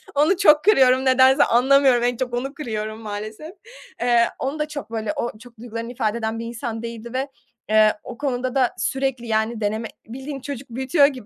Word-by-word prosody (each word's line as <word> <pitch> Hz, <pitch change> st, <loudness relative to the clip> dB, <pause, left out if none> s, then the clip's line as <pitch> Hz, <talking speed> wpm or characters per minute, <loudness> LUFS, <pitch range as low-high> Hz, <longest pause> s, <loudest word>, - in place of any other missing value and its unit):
Onu 305 Hz, +6 st, +3 dB
çok 305 Hz, -6 st, +5 dB
kırıyorum 260 Hz, -10 st, +5 dB
nedense, 260 Hz, +1 st, +5 dB
anlamıyorum, 260 Hz, 0 st, +4 dB
en 245 Hz, -1 st, 0 dB
çok 250 Hz, -2 st, -3 dB
onu 265 Hz, +3 st, -3 dB
kırıyorum, 220 Hz, -6 st, -5 dB
maalesef. 215 Hz, +8 st, -7 dB, 0.5 s
Eee, 240 Hz, -1 st, +4 dB
onu 275 Hz, +4 st, -3 dB
da 300 Hz, -, -1 dB
çok 285 Hz, -6 st, -7 dB
böyle, 225 Hz, +4 st, -2 dB
o 240 Hz, -6 st, -3 dB
çok 235 Hz, -1 st, -16 dB
duygularını 230 Hz, 0 st, -6 dB
ifade 230 Hz, -2 st, -1 dB
eden 225 Hz, 0 st, -3 dB
bir 230 Hz, -, -5 dB
insan 235 Hz, -1 st, -5 dB
değildi 235 Hz, 0 st, -7 dB
ve, 265 Hz, +2 st, -1 dB, 0.4 s
eee, 215 Hz, 0 st, +5 dB
o 240 Hz, -, -9 dB
konuda 255 Hz, -2 st, -2 dB
da 255 Hz, -3 st, +2 dB
sürekli, 265 Hz, -3 st, -2 dB
yani, 220 Hz, 0 st, -1 dB
deneme, 220 Hz, +2 st, -1 dB, 0.2 s
bildiğin 270 Hz, +3 st, -7 dB
çocuk 270 Hz, -2 st, -7 dB
büyütüyor 265 Hz, +5 st, +3 dB
gibi 255 Hz, -6 st, -7 dB
245 Hz, 185 wpm, -22 LUFS, 230-270 Hz, 0.5 s, çok